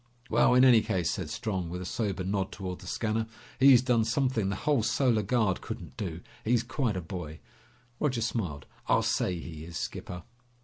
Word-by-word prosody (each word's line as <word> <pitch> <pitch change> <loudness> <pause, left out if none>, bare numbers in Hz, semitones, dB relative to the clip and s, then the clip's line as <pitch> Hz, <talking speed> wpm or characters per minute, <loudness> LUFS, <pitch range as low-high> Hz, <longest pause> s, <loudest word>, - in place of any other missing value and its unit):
"Well, 125 - +5
in 125 +1 +7
any 120 -4 +7
case," 90 -5 0
said - - -4
Strong 95 -6 -3
with 90 +1 -5
a 90 - -6
sober 100 -1 -2
nod 95 0 -1
toward 90 -2 -5
the - - -11
scanner, 110 0 -1 0.3
"he's 130 -2 +7
done 120 -3 +3
something 115 -3 +1
the 100 - -1
whole 145 +2 +1
Solar 115 +1 +2
Guard 105 -3 +1
couldn't - - -7
do. 90 -6 -5 0.2
He's 120 +1 +2
quite 120 -4 -1
a - - -2
boy!" 80 -2 -7 0.6
Roger 130 -6 0
smiled. 90 - -2 0.2
"I'll - - +3
say 90 - 0
he 80 -2 -8
is, 85 0 -7
skipper!" 90 -1 -5
105 Hz, 185 wpm, -29 LUFS, 90-120 Hz, 0.6 s, in